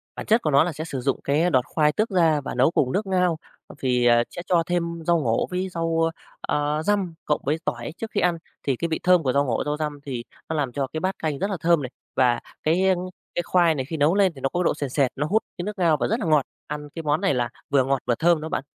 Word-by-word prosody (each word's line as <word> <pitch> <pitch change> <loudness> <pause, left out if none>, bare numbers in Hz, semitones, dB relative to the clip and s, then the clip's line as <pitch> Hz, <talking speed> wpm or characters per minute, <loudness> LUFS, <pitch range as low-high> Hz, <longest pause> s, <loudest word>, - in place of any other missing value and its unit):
Bản - - -6
chất 225 +2 +3
của 155 - 0
nó 140 +1 +6
là 175 - -1
sẽ 155 +3 -5
sử 135 -5 -4
dụng 135 +1 0
cái 155 +5 +2
đọt 130 -5 +2
khoai 150 0 +2
tước 215 +6 0
ra 165 -6 +3
và - - -5
nấu 130 +5 +4
cùng 130 -6 +1
nước 205 +1 0
ngao 180 -3 +2 0.4
vì, 125 -2 +1
à, 120 0 +5
sẽ 175 - -7
cho 170 -2 +3
thêm 175 -1 0 0.2
rau 170 -1 +4
ngổ 115 -6 0
với 185 +1 -2
rau, 165 -1 0 0.3
a, 150 +1 -1
răm, 195 -2 0
cộng 150 - 0
với 150 +4 +1
tỏi 120 +5 -3
trước 225 -1 -6
khi - - 0
ăn, 175 -2 +2 0.3
thì 135 - +1
cái 170 +7 -2
vị 160 - -2
thơm 180 -2 +5
của 130 - +1
rau 140 0 +3
ngổ, 120 -4 0
rau 150 0 -1
răm 150 -2 -3
thì 125 -4 -4 0.3
nó 160 - -1
làm 140 -4 -1
cho 135 +1 -2
cái 160 - -2
bát 190 +3 -1
canh 150 -3 -2
rất 200 - -1
là 195 - -2
thơm 170 -2 +3
này 130 - -4 0.3
và 125 -2 +3 0.2
cái, 165 +4 +2
a, 190 - +5 0.4
cái 175 - 0
khoai 170 -3 +3
này 130 -3 -2
khi 160 +2 -5
nấu 150 +5 +3
lên 195 -3 +4
thì 135 - -11
nó 135 - 0
có 175 - -2
cái - - +2
độ - - +3
sền 145 -2 -3
sệt, 130 -1 +1
nó 145 +2 -1
hút 215 +7 +2
cái 175 - -3
nước 210 +1 -5
ngao 165 -4 +3
và - - 0
rất 225 +3 0
là 220 - -3
ngọt, 155 -4 +3 0.2
ăn 150 0 -6
cái 165 - -5
món 150 +3 +1
này 195 -5 +2
là 120 -2 0 0.2
vừa 140 -2 +4
ngọt, 135 0 +1
vừa 120 - +1
thơm 170 -1 +3
đó 160 - -5
bạn. - - -2
155 Hz, 290 wpm, -24 LUFS, 140-175 Hz, 0.4 s, nó